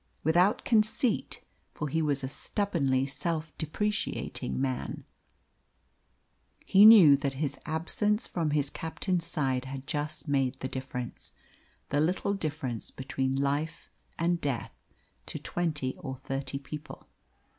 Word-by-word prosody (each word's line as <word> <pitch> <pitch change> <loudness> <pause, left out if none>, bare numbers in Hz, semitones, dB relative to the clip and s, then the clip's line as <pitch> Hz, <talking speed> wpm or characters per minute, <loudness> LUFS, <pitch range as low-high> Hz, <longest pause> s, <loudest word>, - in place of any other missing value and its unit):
Without 175 +6 +3
conceit 220 +1 +2 0.3
for 150 - -2
he 160 +3 0
was 145 -3 0
a - - -1
stubbornly 140 -5 0
self 155 +3 -3
depreciating 185 - -2
man 130 -2 -2 1.6
he 200 +2 +7
knew 195 -10 +10
that 140 -1 -2
his 140 -1 -2
absence 205 +7 +1
from 165 -3 -1
his 145 -1 +1
captain's 170 +2 -2
side 135 -6 0
had 135 0 -6
just 150 +1 -3
made 135 -2 +1
the 130 - -3
difference 130 -2 -6 0.6
the 145 - +2
little 180 +5 +1
difference 145 - -3
between 130 0 -2
life 145 +4 -1 0.3
and 170 +1 +1
death 135 -6 -2 0.5
to - - -4
twenty 150 -7 -1
or 130 - -5
thirty 135 +1 -3
people. 150 +2 -9
150 Hz, 125 wpm, -29 LUFS, 135-170 Hz, 1.6 s, knew